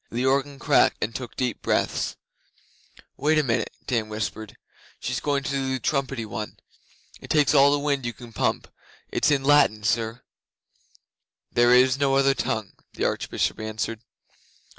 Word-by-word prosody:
The 120 +3 -2
organ 140 +1 +1
cracked 130 - +3
and 115 - -3
took 125 -2 -7
deep 125 -2 -2
breaths. - - 0 1.0
'Wait 155 +2 +2
a 155 - +3
minute,' 115 -4 -1
Dan 115 -4 -1
whispered. 110 0 -5 0.4
'She's 125 0 -2
going 140 -1 -1
to 135 - -3
do 135 -1 -1
the - - -4
trumpety 135 -4 -1
one. 105 0 -6 0.6
It - - -11
takes 150 -2 +3
all 140 -1 +6
the 145 - +3
wind 140 -2 -1
you 120 - -3
can 115 +1 -13
pump. - - -1 0.4
It's - - +2
in 140 -2 +2
Latin, 135 -7 +4
sir.' 110 +2 -1 1.3
'There 120 +1 +5
is 130 +1 +4
no 135 -1 +2
other 135 0 +4
tongue,' 110 -6 -3 0.2
the - - -2
Archbishop - - -1
answered. 110 +1 -4
130 Hz, 160 wpm, -25 LUFS, 115-140 Hz, 1.3 s, all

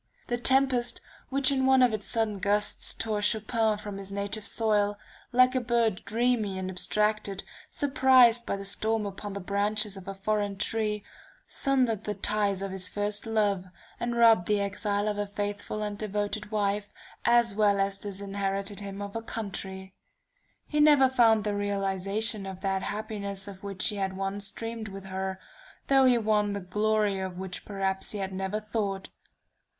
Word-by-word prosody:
The 240 - -1
tempest 255 -1 +3 0.3
which 275 0 +4
in 265 -1 +2
one 265 -1 +6
of 245 -3 +4
its 210 -2 -3
sudden 220 -4 0
gusts 205 +2 +1
tore 215 -2 -2
Chopin 220 +1 +1
from 205 -1 -7
his 195 0 -7
native 200 +1 -2
soil, 205 -2 +1 0.3
like 255 +1 +5
a 255 - +1
bird 235 -5 +1
dreamy 225 -4 0
and 185 0 -3
abstracted 210 +1 0 0.3
surprised 260 -5 +5
by - - -2
the 195 0 -7
storm 215 +2 0
upon 200 0 -6
the 200 - -4
branches 205 +2 0
of 195 -1 -11
a 195 - -5
foreign 205 0 -1
tree, 210 0 -1 0.4
sundered 250 -6 0
the 210 - -2
ties 205 -2 0
of 195 - -4
this 185 -1 +1
first 205 +2 -2
love, 205 -4 +1 0.3
and 240 0 -2
robbed 225 -6 +5
the 210 -1 +2
exile 205 +1 -1
of 210 -1 -1
a 205 - -1
faithful 205 +1 -4
and 205 -1 -4
devoted 210 0 -2
wife, 205 -1 -1 0.3
as 235 -2 +4
well 205 -1 +3
as 195 0 0
disinherited 200 0 -3
him 200 0 -6
of 200 +1 -8
a 225 - -2
country. 190 -4 -6 0.7
He 300 - -2
never 295 -3 +6
found 225 -4 +4
the 210 0 -1
realization 200 +1 0
of 190 -1 -7
that 195 -1 0
happiness 200 -2 -5
of 195 -2 -10
which 200 +1 0
he 210 - -5
had 190 -1 -2
once 195 +1 -3
dreamed 225 0 -6
with 195 -1 -8
her, 190 0 -4 0.5
though 270 -1 +6
he 250 -2 +5
won 210 -2 +1
the 200 - -3
glory 210 +1 0
of 185 -1 -5
which 185 -1 -6
perhaps 195 -1 -2
he - - -4
had 195 -1 -4
never 190 +2 -2
thought. 205 -3 -3
205 Hz, 170 wpm, -28 LUFS, 195-225 Hz, 0.7 s, one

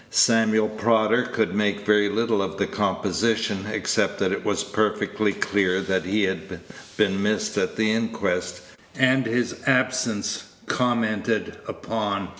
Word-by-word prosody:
Samuel 110 -2 +3
Prodder 110 +2 +1
could 110 - 0
make 105 -1 0
very 105 -1 +3
little 110 0 0
of 95 - -4
the - - +1
composition, 110 -3 -1
except 110 - 0
that - - 0
it - - -2
was - - 0
perfectly 110 0 0
clear 95 -2 0 0.2
he 100 +4 -1
had 95 0 -3 0.4
been 100 -2 +2
missed 105 +1 0
at 95 - -1
the 110 0 +1
inquest, 110 -5 -2 0.3
and 130 -1 +3
his 120 +1 -1
absence 130 -5 0 0.2
commented 115 -5 0
upon. 100 -4 -3
110 Hz, 130 wpm, -24 LUFS, 100-115 Hz, 0.4 s, Samuel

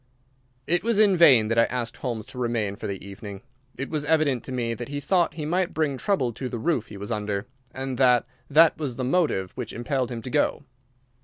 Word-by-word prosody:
It 175 +2 +1
was 230 -1 +1
in 205 -3 +5
vain 135 -11 +6
that 115 0 +2
I 115 - +6
asked 120 -2 -3
Holmes 115 -5 -4
to 125 - -7
remain 115 -5 -1
for 110 - -6
the 100 -1 -5
evening. 100 +1 -9 0.3
It 135 - -5
was 155 -2 -1
evident 150 -5 +2
to - - -6
me 120 -2 -1
that 120 +1 -6
he 145 0 -4
thought 175 +4 +1
he 155 -2 -4
might 180 +3 0
bring 155 -3 +1
trouble 130 - 0
to 130 +3 -5
the 120 - -4
roof 125 -2 0
he 105 - -10
was 100 +3 -6
under, 105 -2 -2 0.3
and 130 -1 -5
that 125 -3 +5 0.2
that 160 +3 +5
was 140 -6 -3
the 130 - -3
motive 125 - +1
which 125 -4 -6
impelled 130 +1 -1
him 115 -2 -6
to 130 - -5
go. 145 0 +1
125 Hz, 225 wpm, -25 LUFS, 115-155 Hz, 0.3 s, vain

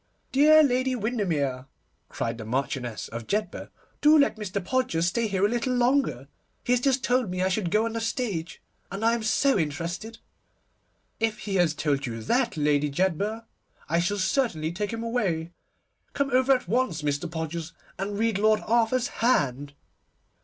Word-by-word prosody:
'Dear 310 +3 +6
Lady 255 -1 +1
Windermere,' 165 - -1 0.4
cried 115 0 -3
the - - -5
Marchioness 120 -2 -3
of 115 -1 -7
Jedburgh, 210 +1 -2 0.3
'do 305 +1 +6
let 280 - +3
Mr. 210 -2 -4
Podgers 255 -10 0
stay 225 +6 0
here 195 -1 +1
a - - +5
little 240 +3 -1
longer. 245 - +1 0.4
He 245 - +1
has 250 - +3
just 265 0 +1
told 250 -3 +1
me 180 0 -2
I 190 - +2
should 185 -2 -1
go 215 +5 +2
on 230 - -3
the 230 - -3
stage, 225 -7 -3 0.3
and 200 +4 -3
I 230 - +4
am 235 - -1
so 240 +2 +2
interested.' 170 +8 -4 1.0
'If 225 -1 -1
he 200 - -4
has 170 -3 +2
told 145 -3 -1
you 115 -1 -5
that, 245 - 0
Lady 150 0 +2
Jedburgh, 190 +8 -1 0.4
I 170 +2 +1
shall 195 +4 0
certainly 190 - 0
take 205 +4 -3
him 230 0 -4
away. 190 -9 -1 0.6
Come 280 -1 -1
over 260 +2 +3
at 255 -7 -1
once, 220 -7 0
Mr. 145 +3 -1
Podgers, 160 0 -4 0.3
and 200 +1 -3
read 220 -2 +1
Lord 215 0 +3
Arthur's 235 +2 +2
hand. 145 - +1
205 Hz, 170 wpm, -26 LUFS, 160-240 Hz, 1.0 s, Dear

